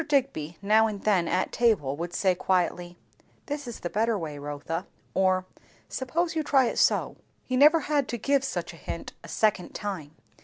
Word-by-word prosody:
Digby 255 - 0
now 220 +2 +5
and 205 -2 -5
then 190 -5 +3
at 185 - 0
table 210 - +2
would 170 +3 -4
say 185 +1 +2
quietly, 175 -1 -1 0.5
"This 290 -2 -4
is 240 - -7
the 175 - -3
better 225 +1 +1
way, 155 -5 -5
Rotha," 145 +5 -4 0.3
or, 185 -1 +2 0.4
"Suppose 325 +7 -1
you 320 - +1
try 275 -3 +3
it - - -1
so." - - +2 0.3
He 255 - -2
never 300 +5 +6
had 290 -2 0
to 240 - -3
give 275 +4 +2
such 270 - -3
a - - -13
hint - - -6
a - - -10
second 210 -5 0
time. 160 -8 -5
205 Hz, 185 wpm, -27 LUFS, 175-260 Hz, 0.5 s, never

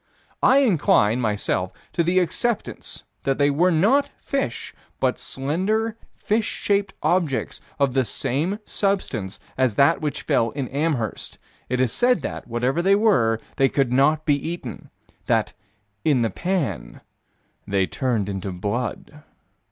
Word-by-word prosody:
I 275 +2 +5
incline, 125 - +3
myself, 105 -4 0 0.2
to - - +1
the 175 +3 +1
acceptance 200 +6 -1 0.2
that 135 -1 0
they 145 0 +3
were 170 +6 +3
not 210 - +3
fish, 275 - -3 0.3
but - - +1
slender, 195 +11 -1 0.2
fish 215 +1 0
shaped 200 -1 0
objects 170 -7 0 0.2
of 140 -3 +1
the 130 0 +3
same 150 - -1
substance 140 - -1 0.2
as 130 -5 +2
that 140 +7 +4
which 150 -2 -3
fell 115 0 +1
at 135 -4 -3
Amherst 140 - -2 0.3
it 125 0 0
is 130 -3 +2
said 245 0 +2
that, - - -5
whatever 125 +7 0
they 195 +3 +4
were, 125 - +3 0.2
they 135 0 +4
could 135 -3 +1
not 150 +4 +3
be 145 - +4
eaten: 145 -3 -5 0.4
that - - +1 0.5
"in 140 -6 +3
the 115 - 0
pan, 165 - -2 0.7
they 100 -1 +2
turned 100 - -2
to 95 - -4
blood." 110 +10 -4
140 Hz, 140 wpm, -23 LUFS, 120-185 Hz, 0.7 s, I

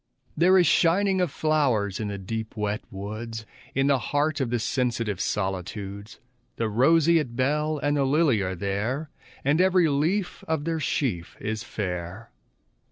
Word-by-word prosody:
There 185 +4 +5
is 180 - +5
shining 185 +4 +3
of 180 - +1
flowers 135 -11 +1
in 110 - -2
the 100 -1 -4
deep 110 +3 -5
wet 105 0 -1
woods, 110 +3 -6 0.3
In 135 +1 +2
the 140 -2 +3
heart 145 +5 0
of 130 - 0
the 120 - +1
sensitive 115 -4 -1
solitudes, 100 +1 -4 0.4
The 115 - -1
roseate 150 +3 +3
bell 150 +4 +1
and 145 0 0
the 140 - +2
lily 135 -5 +3
are 95 -1 -2
there, 105 - -2 0.3
And 150 +5 +3
every 185 -2 +4
leaf 165 +7 0
of 160 -2 -1
their 165 -1 -1
sheaf 115 - -2
is 110 +1 -3
fair. 95 0 -5
125 Hz, 155 wpm, -26 LUFS, 105-155 Hz, 0.4 s, There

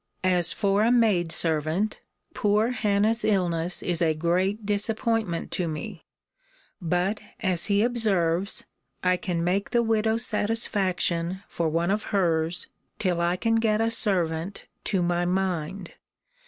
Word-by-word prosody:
As 180 -2 +2
for 200 -1 +1
a 230 +2 +3
maid 210 -9 +3
servant, 165 +6 0 0.3
poor 210 +3 +1
Hannah's 220 0 +1
illness 175 -4 0
is 175 -2 -1
a 160 -2 +2
great 185 +6 0
disappointment 215 -2 -1
to 180 - -1
me: 155 -1 -6 0.8
but, 180 +5 0 0.2
as 185 -3 0
he 205 0 +3
observes, 200 -7 +1 0.4
I 180 0 +3
can 180 -2 -2
make 190 +3 0
the 240 -1 +2
widow 220 0 +1
satisfaction 195 -6 0
for 165 -2 -1
one 170 +3 0
of 210 +1 -1
hers, 170 -4 0 0.3
till 180 -3 0
I 175 +1 +1
can 225 +4 +1
get 220 -1 +1
a 225 0 +1
servant 180 -5 0 0.2
to 190 -4 0
my 175 0 +1
mind. 180 0 -2
190 Hz, 135 wpm, -26 LUFS, 170-215 Hz, 0.8 s, a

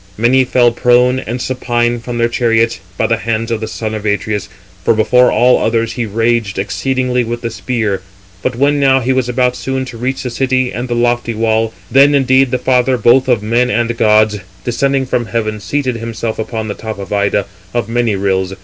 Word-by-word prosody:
Many 125 +4 +3
fell 120 -1 +3
prone 125 +2 +3
and 120 0 -5
supine 120 -2 -1
from 120 +1 -5
their 115 0 +2
chariots, 115 -1 +1 0.2
by - - +1
the 115 - +1
hands 115 0 -2
of 115 -1 -2
the 110 - -3
son 110 0 -4
of 110 -1 -5
Atreus; 105 0 -2 0.3
for 110 - +3
before 125 +3 +4
[all 125 +1 +4
others] 115 0 0
he 120 -3 -3
raged 115 -1 0
exceedingly 125 +4 -1
with 120 +1 -4
the 115 - -3
spear. 110 -5 -2 0.4
But 130 +3 -2
when 145 +3 +2
now 135 -1 +3
he 130 +2 +1
was 130 -2 0
about 125 0 +1
soon 130 +1 -3
to 120 -3 -9
reach 130 +2 -2
the 125 - -4
city 130 0 0
and 120 +2 -4
the 120 - -2
lofty 120 -1 0
wall, 110 0 +1 0.2
then 140 +2 +5
indeed 135 -1 +3
the 125 - 0
father 125 0 +2
both 125 +4 +4
of 120 -5 +1
men 120 +3 +1
and 120 +1 0
gods, 110 -1 +3 0.2
descending 135 +2 0
from 120 -2 -1
heaven, 110 -2 -2
seated 130 +4 -2
himself 115 -1 -4
upon 110 0 -4
the 105 - -3
tops 110 0 -7
of 100 +1 -6
Ida, 100 -1 +1 0.3
of 120 -1 -2
many 115 -2 0
rills. 95 -1 -1
120 Hz, 205 wpm, -15 LUFS, 110-125 Hz, 0.4 s, then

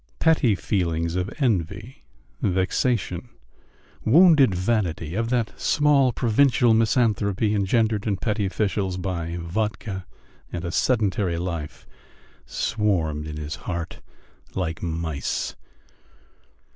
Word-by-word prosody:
Petty 150 -10 +3
feelings 85 -4 -1
of 90 +2 -1
envy, 100 - -2 0.4
vexation, 95 +2 0 0.7
wounded 150 - +6
vanity, 90 -5 -1
of 115 +3 -1
that 120 -3 0
small, 145 -3 +3
provincial 120 +1 +3
misanthropy 110 -2 +2
engendered 105 +1 +1
in 100 -2 0
petty 105 +1 -1
officials 95 -2 -1
by 85 -2 -3
vodka 95 +1 -3 0.4
and 85 0 -4
a 85 - -3
sedentary 100 -6 +1
life, 85 -3 -5 0.6
swarmed 85 -9 -1
in 75 -1 -6
his 75 0 -5 0.2
heart 85 -2 -4 0.5
like 85 -3 -2
mice. 80 -5 -3
100 Hz, 100 wpm, -24 LUFS, 85-115 Hz, 0.7 s, wounded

